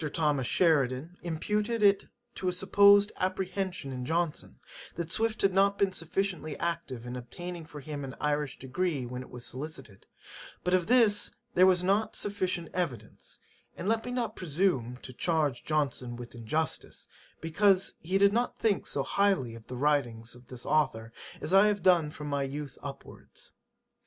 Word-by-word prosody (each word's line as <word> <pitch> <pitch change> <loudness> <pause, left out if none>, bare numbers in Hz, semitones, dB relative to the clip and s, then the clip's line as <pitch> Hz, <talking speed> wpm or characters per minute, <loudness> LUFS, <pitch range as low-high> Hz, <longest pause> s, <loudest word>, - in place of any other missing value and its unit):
Thomas 145 -6 +1
Sheridan 150 0 +2
imputed 210 +7 -1
it 200 -1 +4 0.3
to 185 - -4
a - - +3
supposed 200 +2 +5
apprehension 185 -4 -2
in 125 -1 -5
Johnson, 165 +3 -2 0.4
that 170 -1 -4
Swift 225 0 0
had 195 -1 +4
not 200 +1 +3
been 195 -1 +2
sufficiently 170 -3 -2
active 165 -8 -3
in 125 +1 -5
obtaining 170 +7 -7
for 150 -2 -9
him 145 0 -6
an 135 -1 -6
Irish 150 -2 -1
degree 140 +1 -2
when 125 +1 -5
it 130 - -11
was 125 0 -7
solicited, 130 -6 -8 0.6
but 180 - 0
of 180 -2 +2
this 225 -4 +4 0.2
there 185 -3 +6
was 180 -1 +4
not 200 +4 +1
sufficient 185 -4 -2
evidence; 130 - -4 0.4
and 185 - -4
let 225 +1 +1
me - - -5
not 245 -2 -2
presume 150 -8 0
to 130 - -8
charge 150 -3 0
Johnson 140 -5 -1
with 120 0 -9
injustice, 120 +7 -3 0.3
because 190 +4 +2
he 185 +4 0
did 200 +1 +5
not 240 +2 0
think 210 -4 +1
so 140 - -1
highly 190 - +1
of 115 -1 -12
the 125 - -6
writings 120 -5 0
of 125 0 -15
this 125 -1 -9
authour, 115 -7 0 0.3
as 155 +5 -2
I 195 +2 +7
have 205 -3 0
done 175 -5 +4
from 150 0 -8
my 145 -1 -1
youth 140 0 -4
upwards. - - -10
165 Hz, 165 wpm, -29 LUFS, 135-195 Hz, 0.6 s, I